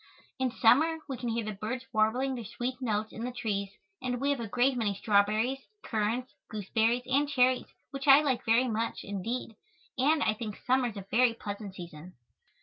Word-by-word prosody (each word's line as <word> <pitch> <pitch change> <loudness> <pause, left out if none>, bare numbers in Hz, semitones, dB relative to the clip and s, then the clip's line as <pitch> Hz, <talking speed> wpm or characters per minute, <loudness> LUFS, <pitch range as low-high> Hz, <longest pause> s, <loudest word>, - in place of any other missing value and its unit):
In 260 -1 +1
summer 280 +8 +4
we 270 - -3
can 245 -1 -3
hear 230 -1 -1
the 215 - -3
birds 220 +6 -4
warbling 240 +5 +2
their 240 -2 -5
sweet 250 +5 -4
notes 215 -3 -1
in 225 - -6
the 250 - -2
trees 205 -5 -2 0.3
and 250 -1 -2
we 280 +2 +1
have 280 - -1
a 230 - -4
great 250 +5 +2
many 215 -4 0
strawberries, 215 +5 +2 0.2
currants, 230 +3 -1 0.2
gooseberries 225 +3 0
and 280 +3 +1
cherries, 255 -2 +3 0.2
which 275 +1 -5
I 275 +1 +9
like 265 -5 0
very 230 +3 +3
much, 225 0 -2
indeed, 225 +5 -4 0.5
and 295 +3 +3
I 215 - +2
think 215 -1 -6
summer 255 0 +1
is 220 -3 -7
a 195 - -7
very 235 0 +4
pleasant 205 -3 -6
season. 175 0 -10
235 Hz, 190 wpm, -30 LUFS, 215-255 Hz, 0.5 s, I